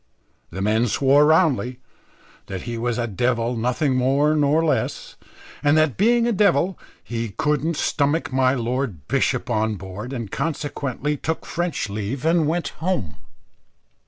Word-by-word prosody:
The 95 +3 -4
men 110 +3 +2
swore 140 +6 +4
roundly 145 -6 +2 0.7
that 95 -2 -5
he 120 -1 -4
was 115 0 -1
a 120 - 0
devil 120 +2 0
nothing 125 +4 0
more 140 +4 +2
nor 150 +2 +3
less, 155 - -1 0.5
and 145 +1 +3
that, 155 -5 +3
being 235 +4 +3
a 240 - +2
devil, 185 -4 +2 0.2
he 115 -1 -4
couldn't 150 +7 -1
stomach 145 -1 0
my 130 0 +3
lord 120 - -3
bishop - - 0
on 110 0 +1
board, 100 +5 -7
and 115 -7 -5
consequently 145 -2 -2
took 160 +3 -3
French 175 -8 -2
leave 105 +7 -4
and 165 -1 +3
went 170 +2 -1
home. 160 - -1
135 Hz, 145 wpm, -22 LUFS, 115-155 Hz, 0.7 s, swore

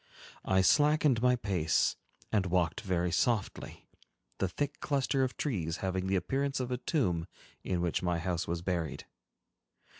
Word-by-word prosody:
I 95 0 +3
slackened 145 +3 +4
my 125 0 +4
pace, 95 -9 +1 0.4
and 100 -4 +2
walked 90 -2 +1
very 90 -4 0
softly, 95 +6 -1 0.5
the 95 - +1
thick 145 +8 -3
cluster 135 -1 +1
of 130 - -2
trees 90 - -2
having 95 0 -1
the 95 - +1
appearance 135 +10 0
of 125 -1 -3
a 125 - 0
tomb 90 - 0 0.4
in 90 -2 -1
which 85 -2 0
my 90 -1 0
house 85 0 -2
was 85 0 -3
buried. 85 -4 -2
95 Hz, 150 wpm, -31 LUFS, 85-125 Hz, 0.5 s, slackened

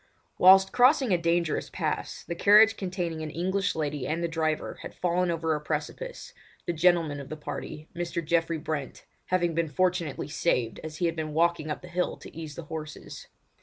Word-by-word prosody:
Whilst 190 +1 +7
crossing 255 -2 +4
a - - +4
dangerous 170 -1 0
pass - - -3
the - - -4
carriage 210 +5 +6
containing 180 -5 -3
an 155 - -4
English 190 +5 -1
lady 150 -3 -2
and 165 +2 -1
the - - +1
driver 160 -2 -2
had - - -9
fallen 180 0 +1
over 165 -1 0
a 150 - -2
precipice, 470 - -5 0.3
the 175 - -1
gentleman 165 -3 +2
of 140 - -9
the 155 - -5
party, 150 +1 -7
Mr. 170 -1 -3
Geoffrey 165 0 +1
Brent, 150 -4 -5 0.2
having 175 -2 +1
been 165 0 0
fortunately 175 -1 0
saved 125 -7 0
as 155 -1 -7
he 175 - 0
had 165 -1 0
been 155 -2 -4
walking 170 -1 +2
up 150 - -4
the - - -9
hill 180 +1 -1
to - - -13
ease 155 -3 -7
the 170 - -7
horses. 155 -1 -8
170 Hz, 190 wpm, -28 LUFS, 155-180 Hz, 0.3 s, Whilst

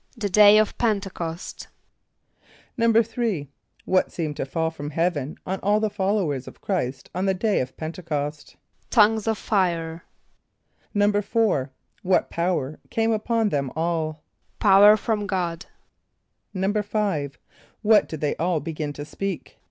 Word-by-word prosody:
=The 210 -3 -2
Day 210 +2 +7
of 215 -1 +2
P[)e]n´te 200 -5 0
c[)o]st.= 165 +1 -6 1.1
=3.= 230 - +1 0.4
What 185 - +2
seemed 155 -4 -3
to - - -3
fall 160 +3 -1
from 145 -2 -6
heaven 155 -3 -1
on 190 +1 -3
all 210 +1 +2
the 215 -1 0
followers 190 - -1
of - - -11
Chr[=i]st 140 -10 -3
on 185 +2 -1
the 190 - +2
day 210 +2 +1
of 130 +1 -4
P[)e]n´te 165 +3 -6
c[)o]st? 150 -2 -4 0.3
=Tongues 220 -1 +4
of 220 -1 +1
fire.= 170 -6 -1 0.9
=4.= 205 - +2 0.3
What 185 0 +1
power 170 -5 -1
came 225 0 +1
upon 225 0 +1
them 140 -6 -1
all? 160 -2 -2 0.3
=Power 205 +1 +7
from 210 -1 -2
God.= 175 -3 -2 0.9
=5.= 200 -6 -1 0.5
What 215 0 +5
did 160 - -6
they 150 - 0
all 170 0 +1
begin 150 -1 -4
to 145 0 -7
speak? 195 +3 -5
185 Hz, 135 wpm, -24 LUFS, 155-210 Hz, 1.1 s, Day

